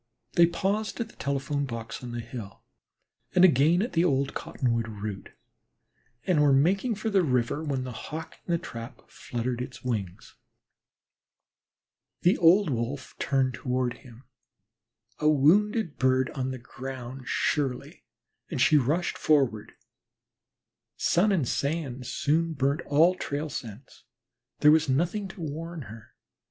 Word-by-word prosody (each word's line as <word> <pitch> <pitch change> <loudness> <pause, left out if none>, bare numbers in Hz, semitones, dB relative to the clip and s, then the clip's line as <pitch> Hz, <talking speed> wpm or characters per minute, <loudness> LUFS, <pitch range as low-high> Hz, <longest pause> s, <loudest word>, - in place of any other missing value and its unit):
They 170 0 +6
paused 200 +7 -2
at 230 -1 -3
the - - -18
telephone 140 +1 -1
box 115 -2 -6
on 120 - -6
the 120 0 -4
hill 115 -3 -9 0.7
and 180 0 +8
again 165 +4 +4
at 240 - -4
the 165 - +3
old 140 -5 +1
cottonwood 115 -4 -1
root, 105 -2 -6 1.0
and 175 -5 +3
were 145 -1 +5
making 190 - +2
for 215 +2 -3
the 195 -2 +4
river 125 0 0
when 140 -4 -2
the 130 - -5 0.2
Hawk 160 +1 -7
in - - -5
the 170 - +3
trap 115 -8 -9
fluttered 120 0 -4
his 125 0 -7
wings. 105 -7 -4 1.8
The 180 - +4
old 175 0 +5
Wolf 125 +3 -3
turned 135 -2 +1
toward 125 -1 -2
him, 125 -2 -15 1.0
a 150 - +3
wounded 175 - +3
bird 130 0 +2
on 130 -2 -3
the 130 - -4
ground 130 +1 -8
surely, 135 -5 -1 0.5
and - - -3
she 155 - +5
rushed 150 +7 0
forward. 125 -8 +1 1.2
Sun 195 +5 +3
and 165 -10 +1
sand 140 -4 -2
soon 165 +3 0
burn 140 +3 0
all 160 +5 +5
trail 150 -3 -4
scents; 120 -1 -8 0.6
there 150 - +7
was 160 -1 +3
nothing 175 +9 0
to 190 - -11
warn 160 +1 -5
her. 110 -1 -13
140 Hz, 140 wpm, -27 LUFS, 125-165 Hz, 1.8 s, and